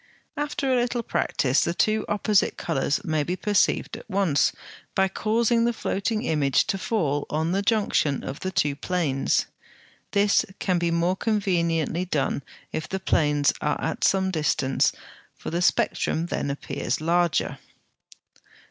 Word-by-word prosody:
After 285 -2 -1
a 245 - +3
little 240 -1 -1
practice 135 - +1
the 170 - -1
two 215 +2 +1
opposite 210 -1 +2
colours 160 +3 -1
may 155 -5 0
be 175 +5 -2
perceived 205 +1 +1
at - - -11
once, 185 -7 +2 0.4
by 190 0 +3
causing 230 +4 +1
the 240 0 +2
floating 215 +1 -2
image 145 - +2
to 195 - -4
fall 150 -10 -1
on 160 +2 -1
the 195 +2 +1
junction 200 - +1
of 135 - -6
the 185 - -3
two 150 -7 0
planes. 150 -4 0 0.6
This 200 0 +3
can 180 -2 0
be 170 0 0
more 170 +2 +1
conveniently 175 -6 0
done 150 -4 -1 0.3
if 160 0 -4
the 190 - -2
planes 145 -5 +2
are 150 0 0
at 160 - -3
some 190 -1 +2
distance, 150 -5 +1 0.4
for - - -7
the 170 +1 -1
spectrum 165 -1 +1
then 155 -4 -2
appears 140 - -3
larger. 170 +1 +1
175 Hz, 150 wpm, -25 LUFS, 155-205 Hz, 0.6 s, a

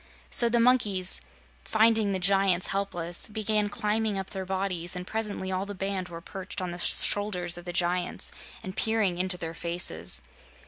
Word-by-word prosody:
So 235 - +4
the 235 0 +2
monkeys, 210 - +4 0.4
finding 220 - +3
the 190 - 0
giants 190 -1 +3
helpless, 175 -3 -3
began 215 -1 0
climbing 210 0 -1
up 190 -1 -5
their 190 -2 -5
bodies, 185 -2 -2
and 180 0 -5
presently 210 -3 -3
all 190 +1 -2
the 205 - -6
band 190 -1 -3
were 165 -1 -8
perched 190 +1 -7
on 180 -1 -3
the 175 - -7
shoulders 180 -3 +3
of 175 0 -9
the 175 - -4
giants 175 0 -1 0.3
and 185 0 -7
peering 215 -6 +1
into 185 0 +1
their 165 -1 -5
faces. 165 - +2
190 Hz, 170 wpm, -27 LUFS, 175-205 Hz, 0.4 s, So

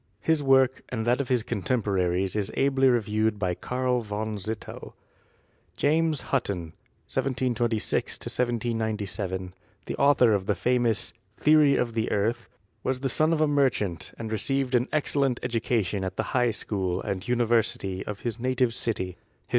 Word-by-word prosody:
His 160 -2 +2
work 135 -1 +4
and 110 -3 -3
that 120 +3 +2
of 130 - -5
his 125 -3 +2
contemporaries 95 -4 0
is 105 -1 -1
ably 135 -1 +3
reviewed 110 -2 +1
by 90 -3 0
Karl 125 +5 -1
von 110 0 -4
Zittell. 110 +3 -6 0.8
James 155 0 +2
Hutton 90 -11 -1 0.3
(1726 120 -4 0
1797), 110 -6 -2 0.3
the - - -4
author 135 -5 +5
of 100 -1 -1
the 105 - +2
famous 120 +2 0 0.2
"Theory 150 -2 +5
of 120 -3 0
the 110 -1 -1
Earth," 115 +3 -1 0.3
was 130 -1 -1
the 135 - 0
son 155 +5 +2
of 160 -2 +1
a 155 - +4
merchant 130 - 0
and 110 -1 -5
received 135 +3 0
an 125 +1 +3
excellent 140 -4 +1
education 110 -4 0
at 95 0 -4
the - - 0
High 125 -1 +3
School 95 -4 -2
and 100 0 -4
University 115 -5 +1
of 105 -1 -6
his 120 -1 -3
native 125 -1 +1
city. 95 -7 -3
115 Hz, 145 wpm, -26 LUFS, 105-130 Hz, 0.8 s, author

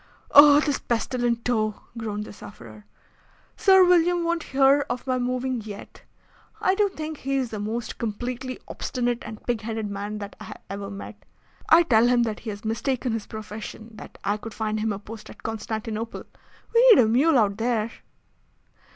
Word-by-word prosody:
"Oh! 290 0 +9
this 295 -2 0
pestilent 240 0 -1
toe!" 215 -3 0 0.2
groaned 215 -2 -4
the - - -10
sufferer. 110 - -12 0.7
"Sir 380 -1 +6
William 350 0 +3
won't 335 0 0
hear 275 0 +3
of 250 - -3
my 255 -1 0
moving 250 0 -1
yet. 205 -1 -10 0.6
I 375 - +2
do 405 +1 +2
think 310 -4 -6
he 275 0 -2
is 255 -3 -2
the 215 - -4
most 220 +3 -4
completely 245 +3 -4
obstinate 245 -1 -2
and 220 -1 -9
pig 240 -2 -1
headed 220 -2 -4
man 205 +1 -4
that 205 -1 -7
I - - -9
have - - -10
ever 200 0 -5
met. 200 +1 -9 0.5
I 330 +2 +7
tell 235 -6 +4
him 245 -1 +3
that 220 -2 -3
he 225 - -7
has 205 +1 -7
mistaken 245 +3 -1
his 225 -2 -4
profession, 215 +1 -8
and 220 - -16
that - - -11
I 205 +1 0
could 225 +1 -9
find 215 -1 -2
him 220 0 0
a 200 - -3
post 215 +1 -10
at - - -14
Constantinople. 220 0 -4 0.5
We 480 +2 +6
need 415 - +8
a - - +2
mule 270 +7 +4
out 205 -3 +2
there." 225 -1 0
230 Hz, 185 wpm, -25 LUFS, 215-265 Hz, 0.7 s, Oh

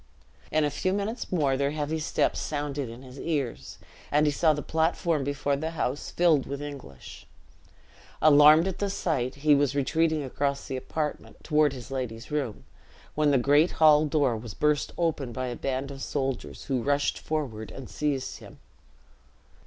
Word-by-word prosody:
In 155 - +2
a 145 - +1
few 185 +5 -1
minutes 205 +4 -3
more 145 -7 +2
their 140 +1 +1
heavy 150 +1 -2
steps 155 - 0
sounded 145 -3 -3
in 120 +3 -10
his 130 +1 -11
ears, 135 - -3 0.3
and 150 +1 +4
he 150 - +3
saw 160 +2 +3
the 150 -1 -2
platform 160 -1 0
before 145 0 -1
the 155 +3 -3
house 135 +2 -2
filled 165 -6 +3
with 140 0 -4
English. 140 - -9 0.9
Alarmed 155 +3 +7
at 190 - -4
the 200 - 0
sight, 140 -10 -1
he 150 - +7
was 140 -1 +2
retreating 155 +2 +1
across 140 +1 -2
the 135 - -3
apartment, 150 +3 -4
toward 150 -2 +3
his 130 -1 -9
lady's 125 -3 -5
room, 140 -7 -2 0.5
when 150 -1 +2
the 140 - +4
great 145 +6 +3
hall 155 -1 +5
door 140 -5 +2
was 110 -2 -7
burst 150 -1 +1
open 155 -7 -1
by 130 +2 -3
a 120 -1 -4
band 135 +2 -3
of 135 -1 -9
soldiers, 135 -2 -3
who 130 -3 -1
rushed 145 +2 0
forward 125 -9 -4
and 135 -3 -9
seized 145 -3 -2
him. - - -13
145 Hz, 170 wpm, -27 LUFS, 135-155 Hz, 0.9 s, Alarmed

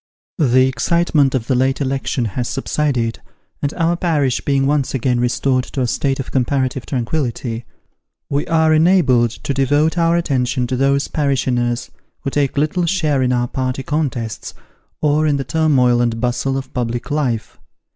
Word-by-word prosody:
THE 130 -3 +4
excitement 140 +2 +1
of 120 -4 -1
the 130 - 0
late 130 +2 +1
election 135 -2 -1
has 120 +3 -3
subsided, 135 -5 -1 0.4
and 145 - -1
our 170 0 +1
parish 150 -8 0
being 135 -1 +1
once 140 -1 0
again 125 -1 0
restored 130 +1 +1
to 135 - -4
a - - +2
state 135 +3 -1
of 135 - -5
comparative 130 -1 -1
tranquillity, 120 -3 -2 0.6
we 140 +1 -1
are 160 -1 +3
enabled 155 -8 +4
to 130 +4 -5
devote 145 +5 +1
our 165 0 +3
attention 130 -6 0
to 130 +1 -2
those 140 +2 +1
parishioners 125 -4 -1 0.3
who 135 - -3
take 140 -1 0
little 160 +4 +1
share 155 -7 +1
in 125 -1 +1
our 120 -1 +1
party 130 +1 -3
contests 130 -7 -3 0.5
or 150 +1 +2
in 145 -2 +2
the 135 - -2
turmoil 130 -4 +2
and 115 -1 0
bustle 125 +3 -1
of 135 - -7
public 120 +2 -3
life. 130 -7 -2
135 Hz, 160 wpm, -18 LUFS, 125-150 Hz, 0.6 s, THE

